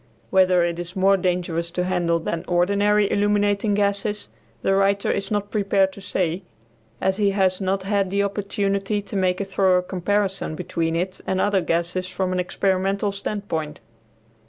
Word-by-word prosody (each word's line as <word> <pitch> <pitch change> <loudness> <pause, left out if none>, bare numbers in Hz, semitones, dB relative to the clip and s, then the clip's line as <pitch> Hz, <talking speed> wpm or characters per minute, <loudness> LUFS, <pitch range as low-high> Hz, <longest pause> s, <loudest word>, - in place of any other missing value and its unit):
Whether 185 -2 +4
it 170 0 -1
is 175 +2 -6
more 195 +1 +4
dangerous 175 -2 -1
to 180 +1 -2
handle 175 -2 +1
than 165 0 -3
ordinary 200 +4 +3
illuminating 205 0 +2
gases 205 +1 0 0.3
the 195 - +2
writer 195 +1 +2
is 195 -1 -2
not 205 -1 -2
prepared 195 -2 +2
to 200 - -11
say, 180 -2 -1 0.6
as 190 +1 0
he 205 -2 +3
has 185 0 +2
not 190 0 0
had 200 -1 0
the 200 +1 +1
opportunity 200 0 -1
to 205 - -8
make 185 -1 +1
a 200 - -1
thorough 190 -1 +2
comparison 190 -1 -1
between 165 -1 -2
it 185 +2 -2
and 190 - 0
other 200 -1 +2
gases 170 +2 -1
from 185 0 -2
an 180 - 0
experimental 195 +2 0
standpoint. 195 -7 -4
190 Hz, 160 wpm, -23 LUFS, 180-200 Hz, 0.6 s, Whether